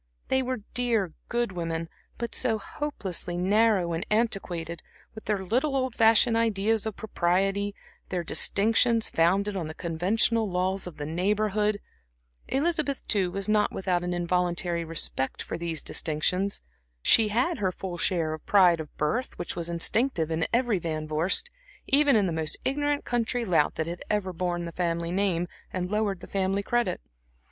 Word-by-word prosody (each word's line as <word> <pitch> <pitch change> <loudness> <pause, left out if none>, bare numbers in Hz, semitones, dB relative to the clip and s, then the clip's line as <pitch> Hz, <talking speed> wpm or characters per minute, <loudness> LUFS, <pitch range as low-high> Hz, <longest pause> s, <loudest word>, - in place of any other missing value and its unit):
They 265 - +3
were 255 -3 -3
dear, 225 -8 0 0.2
good 240 -2 0
women, 165 -2 -3 0.3
but 235 -1 -4
so 230 -4 +3
hopelessly 195 - -4
narrow 195 -1 +3
and 165 +2 -2
antiquated, 180 -7 -1 0.3
with 220 - -10
their 200 -3 -1
little 260 +8 +1
old 260 -2 0
fashioned 225 +1 +5
ideas 220 -1 +1
of 215 - -4
propriety, 195 0 0 0.3
their 180 -2 -2
distinctions 225 +6 +3
founded 195 +5 +2
on 175 -5 -3
the 155 - -7
conventional 200 +6 +1
laws 185 +1 0
of 175 - -9
the 145 - -4
Neighborhood. 210 +5 0 0.7
Elizabeth, 295 -1 0
too, 195 -4 +1
was 195 +3 -3
not 215 -1 +2
without 180 -2 -1
an 180 - -2
involuntary 175 -1 0
respect 160 -4 -2
for - - -5
these 165 -2 -3
distinctions. 180 +6 -1 0.4
She 225 - +6
had 250 +9 0
her 190 -3 +1
full 180 -1 -6
share 165 -4 +1
of 155 - -7
the - - -25
pride 180 -5 +6
of 155 -2 -8
birth 225 +13 -1
which 175 - -4
was 170 -1 -2
instinctive 170 - +1
in 165 0 0
every 235 -4 +2
Van 155 -2 -3
Vorst, 175 - +1 0.3
even 280 -1 +4
in 210 -3 +4
the 175 - -1
most 160 -1 0
ignorant 290 +1 0
country 240 0 -1
lout 165 -7 +2
that 160 - -1
had 170 +1 -6
ever 195 -3 0
borne 175 0 -2
the 170 - -5
family 170 -1 -1
name 180 -2 +1 0.2
and 180 0 -3
lowered 210 -3 0
the - - -8
family 195 +1 -1
credit. 240 - 0
195 Hz, 165 wpm, -27 LUFS, 170-225 Hz, 0.7 s, She